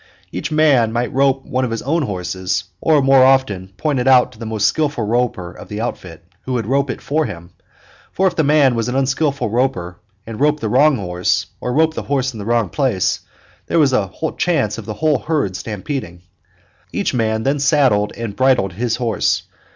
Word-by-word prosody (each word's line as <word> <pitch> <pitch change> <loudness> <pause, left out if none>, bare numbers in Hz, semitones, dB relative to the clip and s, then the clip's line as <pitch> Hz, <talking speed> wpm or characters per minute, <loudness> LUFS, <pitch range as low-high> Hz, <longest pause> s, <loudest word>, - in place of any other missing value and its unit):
Each - - -4
man 145 -7 +3
might 120 +1 -2
rope 135 0 +2
one 130 +1 -1
of 125 - -1
his 115 -1 -4
own 160 +5 0
horses, 95 -5 -2 0.2
or 150 -3 +3
more 135 -1 +6
often 130 -9 +2
point 145 +3 0
it 125 - -1
out 130 -2 +5
to 110 - -18
the 115 - -6
most 110 -2 -1
skillful 145 -6 0
roper 110 -6 -1
of - - -12
the 105 - -5
outfit, 85 -7 -6 0.2
who 130 - -5
would 120 -4 -1
rope 135 +4 0
it - - -4
for 155 +1 0
him 85 +1 -9 0.6
for 190 - 0
if 180 -2 +2
the 160 - +2
man 145 -3 +4
was 115 0 -1
an 125 - -3
unskillful 135 -2 0
roper 115 -8 -1 0.3
and 110 -1 -7
roped 150 +1 +2
the 110 - -2
wrong 145 +5 +4
horse 90 -1 -1
or 125 - -3
roped 160 +4 +2
the - - -4
horse 135 -2 -1
in 110 - -8
the 100 - -6
wrong 115 -3 +1
place 130 -10 0 0.5
there - - 0
was 145 -5 +4
a 100 -6 +1 0.3
chance 160 - 0
of - - -10
the 110 - -4
whole 155 +2 +1
herd 150 - -1
stampeding. 105 - -5 0.7
Each - - -1
man 110 -2 0
then 140 +2 0
saddled 135 -8 +3
and 115 -3 -5
bridled 130 -8 +2
his 115 +4 -1
horse. 115 -4 0
125 Hz, 205 wpm, -18 LUFS, 105-140 Hz, 0.7 s, more